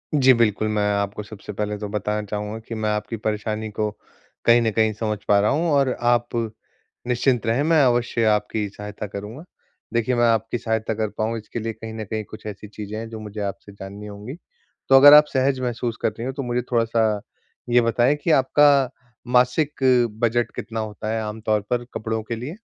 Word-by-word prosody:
जी, 130 -2 +6
बिल्कुल, 110 -2 +1
मैं 105 -1 0
आपको 100 +1 -2
सबसे 105 0 -9
पहले 105 +1 -3
तो 105 0 -5
बताना 105 0 -2
चाहूँगा 105 +2 -4
कि 115 - -5
मैं 110 -1 -1
आपकी 105 +2 -2
परेशानी 110 0 -3
को 105 0 -1 0.6
कहीं 120 0 +6
न 115 -1 +1
कहीं 110 +1 +2
समझ 105 -1 -2
पा 100 -1 +5
रहा 105 - +2
हूँ 165 +4 +1
और 140 -2 +3
आप 120 0 +2 0.8
निश्चिंत 125 -1 +1
रहें, 120 +6 +1
मैं 160 -1 +4
अवश्य 120 -2 +1
आपकी 105 0 +1
सहायता 105 +1 -7
करूँगा। 105 - -8 0.5
देखिए, 120 +2 +1
मैं 120 - +3
आपकी 115 +1 +1
सहायता 110 -1 -1
कर 110 -1 -2
पाऊँ, 115 +1 -1
इसके 110 +2 -6
लिए 115 0 -3
कहीं 110 0 -8
न 110 -1 -5
कहीं 110 -1 -2
कुछ 110 - -11
ऐसी 105 0 -7
चीज़ें 105 0 -7
हैं, 115 0 -6
जो 110 -1 -7
मुझे 105 0 -7
आपसे 100 0 -5
जाननी 100 +1 -9
होंगी। 105 +7 -8 0.5
तो 135 - +7
अगर 145 +2 +10
आप 150 0 +9
सहज 130 0 +2
महसूस 120 -2 -2
कर - - +2
रही 115 +2 -7
हों, 130 - -3
तो 140 0 -4
मुझे 120 0 -1
थोड़ा-सा 115 -3 +1 0.5
ये 120 0 +5
बताएँ 120 +4 +2
कि 165 - +2
आपका 140 -1 +4 0.4
मासिक 125 +5 +2 0.4
बजट 120 0 +1
कितना 115 -1 -5
होता 110 0 -5
है 110 0 -1
आम 105 +1 -6
तौर 110 -1 +1
पर, 120 0 0
कपड़ों 110 0 -3
के 115 +1 -4
लिए? 140 - -7
110 Hz, 200 wpm, -23 LUFS, 105-120 Hz, 0.8 s, अगर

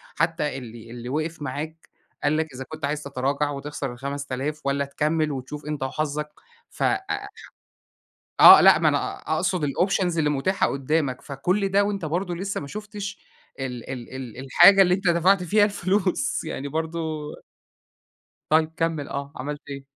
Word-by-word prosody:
حتى 165 -3 0
اللي، 115 -2 -10
اللي 120 0 -7
وقف 155 +3 -3
معاك 155 +4 -6 0.3
قال 145 +1 +2
لك 160 -3 -2
إذا 130 +1 -6
كنت 155 -1 -4
عايز 150 +1 -2
تتراجع 140 +1 -1
وتخسر 140 -2 -5
ال5000 140 +3 -4
والَّا 140 0 0
تكمل 150 +2 0
وتشوف 140 +2 -6
أنت 150 -2 -3
وحظك. 150 +2 -2 0.4
ف - - -5
آآ 390 0 -1 1.1
آه - - +11
لأ - - +8
ما - - +2
أنا - - -2 0.2
أقصد 180 -5 0
الoptions 180 +3 0
اللي 150 -2 +2
متاحة 150 +7 +1
قدامك. 140 -1 -1
فكُلّ 180 +9 -1
ده 200 +1 +3
وأنت 200 -3 -2
برضو 175 +4 -2
لسه 190 +3 -3
ما 140 - -7
شُفتش 210 +2 -7 0.4
ال 125 -3 -5
ال 125 -3 -6
ال 125 -4 -7
الحاجة 185 +8 +7
اللي 180 -2 +5
أنت 190 +1 -1
دفعت 180 +3 +4
فيها 205 +4 +4
الفلوس 200 +4 0
يعني 140 - -5
برضو 160 +3 -3 1.5
طيب 155 +1 +3
كمل 165 -4 -1
آه، 140 0 -5
عملت 145 +3 -5
إيه؟ 140 -1 -7
150 Hz, 155 wpm, -24 LUFS, 140-175 Hz, 1.5 s, آه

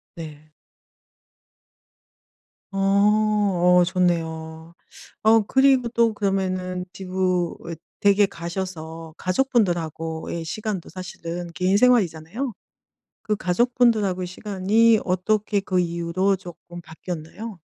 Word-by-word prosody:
네. 155 -2 -10 2.2
어. 195 - -6
어 200 -2 +3
좋네요. 165 -3 -2 0.5
어 220 +1 +6
그리고 265 -2 +4
또 230 -1 +2
그러면은 185 -3 -2
지구 185 -1 -8
어 180 -2 +1 0.5
댁에 205 0 +4
가셔서 165 -3 -6
가족분들하고의 170 - -1
시간도 205 +1 -4
사실은 175 -1 -6
개인 185 +3 +2
생활이잖아요. 220 - +1 0.7
그 210 -1 -1
가족분들하고의 210 -2 +1
시간이 210 +4 +2
어떻게 200 +3 0
그 185 -1 0
이후로 170 +3 0
쪼끔 175 -1 -11
바뀌었나요? 175 +5 -8
185 Hz, 235 characters per minute, -23 LUFS, 170-210 Hz, 2.2 s, 어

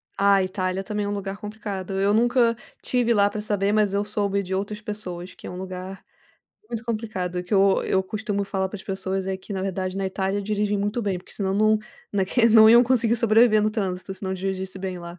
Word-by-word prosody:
Ah, 200 0 +4
Itália 185 0 -2
também 210 0 -3
é - - -2
um - - -1
lugar 200 -1 -4
complicado. 205 -3 -6
Eu 200 +1 +3
nunca 235 +1 +3 0.3
tive 245 -2 +1
lá 205 -2 +4
pra 210 +1 -5
saber, 205 -1 0
mas 210 -2 +2
eu 200 - +1
soube 200 -1 -1
de 185 - -5
outras 205 +2 -3
pessoas, 185 -4 -6
que - - -14
é - - -5
um 180 - -7
lugar 185 +1 -7 0.7
muito 230 0 -5
complicado. 205 -6 -3
Que 180 - -10
eu 195 0 +4
eu 190 - +1
costumo 205 +1 -3
falar 190 -1 -2
para 210 - -7
as 190 - -10
pessoas 190 -1 -3
é 190 0 -1
que, 190 +2 -10
na 190 - -2
verdade, 190 -1 -3
na 195 - -1
Itália 190 +1 -1
dirigem 205 0 0
muito 205 +4 -1
bem, 195 -3 -1
porque - - -15
senão 190 -2 -1
não 215 +1 +4 0.3
na 195 -2 +1
que 230 +4 +3
não 220 0 +8
iam 235 +1 +8
conseguir 235 -2 +2
sobreviver 225 -1 +4
no 215 - +2
trânsito, 190 -3 -3
se - - -15
não 190 -1 -2
dirigisse 190 0 -4
bem 185 -1 -4
lá. 170 +1 -9
200 Hz, 230 wpm, -24 LUFS, 190-215 Hz, 0.7 s, não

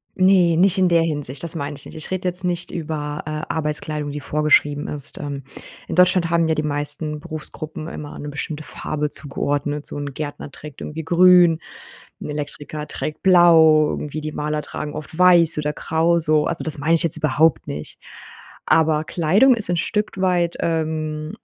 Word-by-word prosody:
Ne, 185 -3 +4
nicht 190 +2 +3
in 185 -1 +3
der 170 -1 +4
Hinsicht. 145 -4 -4
Das 170 0 -4
meine 145 -2 -4
ich 140 - -9
nicht. - - -11
Ich 155 +2 -8
rede 185 0 -2
jetzt 180 +1 -1
nicht 175 -1 -2
über, 150 -2 -4
äh, - - -6 0.2
Arbeitskleidung, 150 -1 -2
die 150 - -5
vorgeschrieben 150 0 +1
ist, 145 0 -1
ähm. 140 -2 -6 0.4
In - - -4
Deutschland 180 -1 +4
haben 170 -1 +2
ja 160 - +1
die 150 - -1
meisten 150 +1 -1
Berufsgruppen 155 -1 -7
immer 150 -3 -8
eine 145 - -7
bestimmte 150 +1 -5
Farbe 150 0 -4
zugeordnet, 145 +1 -2
so - - -3
'n 145 -1 -5
Gärtner 145 0 -6
trägt 150 -1 -11
irgendwie 160 +2 -6
Grün, 175 -1 +5 0.6
'n - - -6
Elektriker 150 0 -6
trägt 155 - -5
blau 165 -4 +6
irgendwie. 150 +1 -4
Die 155 0 -5
Maler 150 0 -2
tragen 150 +1 -6
oft 155 +1 -8
weiß 175 -3 +5
oder 150 0 -2
grau, 165 +3 +1
so 155 -2 +2
also, 170 - -1
das 155 -1 +2
meine 160 +4 +2
ich 165 - +1
jetzt 165 - +4
überhaupt 150 -3 +2
nicht. 75 +1 -7 0.7
Aber 155 -1 +3
Kleidung 195 +13 +3
ist 215 -5 -2
'n 175 - +1
Stück 210 +3 -2
weit, 175 -2 +1
ähm, 155 -1 -2
155 Hz, 180 wpm, -21 LUFS, 150-170 Hz, 0.7 s, blau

